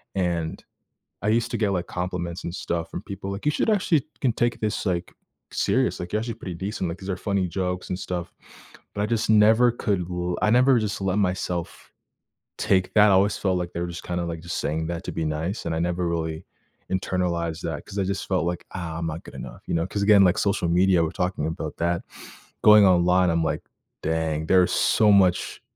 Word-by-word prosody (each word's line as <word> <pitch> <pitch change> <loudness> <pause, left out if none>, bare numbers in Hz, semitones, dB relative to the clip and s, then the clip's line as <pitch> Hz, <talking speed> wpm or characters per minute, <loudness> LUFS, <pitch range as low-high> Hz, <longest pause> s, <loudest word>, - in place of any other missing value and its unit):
And, 85 -4 -1 0.6
I 105 - 0
used 115 +2 +2
to 120 - 0
get, 105 -2 +1
like, 90 -2 -1
compliments 90 -1 -4
and 85 - -4
stuff 85 -3 -3
from - - -6
people, 100 -1 -6
like, 100 - -6
"You - - +5
should 220 - +1
actually 175 -9 +2
can 130 -4 +2
take 120 +2 0
this, 105 -1 -2
like, 90 -1 -1 0.4
serious, - - +1
like, 90 0 -6
you're 105 - +1
actually 115 +1 -4
pretty 95 -5 -7
decent, 95 +1 -3
like, 85 +1 -5
these 95 +1 -6
are 95 - -1
funny 100 -3 0
jokes 90 +1 -3
and 90 - -2
stuff," 90 -2 -4 0.6
but 100 - -1
I 105 - +1
just 115 -1 -1
never 110 +3 +5
could 100 -7 -1
l 90 0 -2
I 105 - +3
never 125 +2 +5
just 105 -3 -2
let 95 +1 0
myself 90 -3 -2 0.7
take 95 -1 +1
that, 105 -1 +7
I - - +5
always 100 +2 +3
felt 95 -2 0
like 90 -1 -3
they - - -3
were 85 - -2
just 85 0 -7
kinda, 90 0 -2
like, 85 -1 -5
just 85 0 -4
saying 80 +2 -2
that 85 -1 -4
to - - -3
be 80 - -2
nice, 80 +7 -3
and 85 - -1
I - - -1
never 90 +1 -1
really 80 0 -3 0.5
internalized 85 -3 -1
that 80 -3 -4
'cause 100 - -9
I - - +2
just 100 +1 -3
felt 90 -3 +1
like, 85 0 -3
"Ah, 85 -3 -5
I'm 85 - -2
not 80 +1 -5
good - - -12
enough," - - -9
you - - -2
know? 85 +2 0
'Cause, 100 +1 -2
again, 100 -1 +6
like 90 - +3
social 100 -3 +1
media, 90 0 +4
we're 80 - 0
talking 90 -4 -2
about 80 - -5
that, 85 +1 0 0.6
going 105 -1 +8
online, 90 0 +4
I'm 85 -1 +1
like, 80 - -2 0.4
"Dang 80 -1 -1
there's 90 0 +4
so 105 -2 +4
much 90 -3 +3
90 Hz, 220 wpm, -24 LUFS, 85-100 Hz, 0.7 s, going